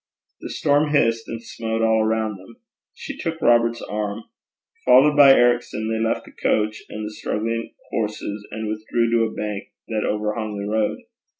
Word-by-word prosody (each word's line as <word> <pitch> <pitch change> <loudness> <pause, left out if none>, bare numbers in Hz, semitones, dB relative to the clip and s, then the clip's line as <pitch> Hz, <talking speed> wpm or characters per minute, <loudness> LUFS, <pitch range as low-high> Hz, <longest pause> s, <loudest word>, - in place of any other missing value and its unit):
The - - -7
storm 145 +1 +2
hissed 115 -4 +2
and 115 0 -6
smote 115 0 -3
all 110 -1 +3
around 110 -1 0
them. 95 +5 -15 0.4
She - - -7
took 165 0 -4
Robert's 120 -3 +3
arm. 105 +1 -4 0.6
Followed 130 +4 +6
by 140 -2 +9
Ericson, 120 -3 +2
they 110 - -1
left 115 - -1
the - - -14
coach 110 0 0
and 110 0 -5
the 105 - -6
struggling 115 +2 -3 0.2
horses, 105 -1 -3
and 110 0 -5
withdrew 110 +2 -1
to 115 -1 +3
a 110 - -4
bank 105 -2 -4 0.2
that 110 -2 -1
overhung 105 0 -2
the 100 0 -4
road. 110 0 0
110 Hz, 170 wpm, -22 LUFS, 105-115 Hz, 0.6 s, by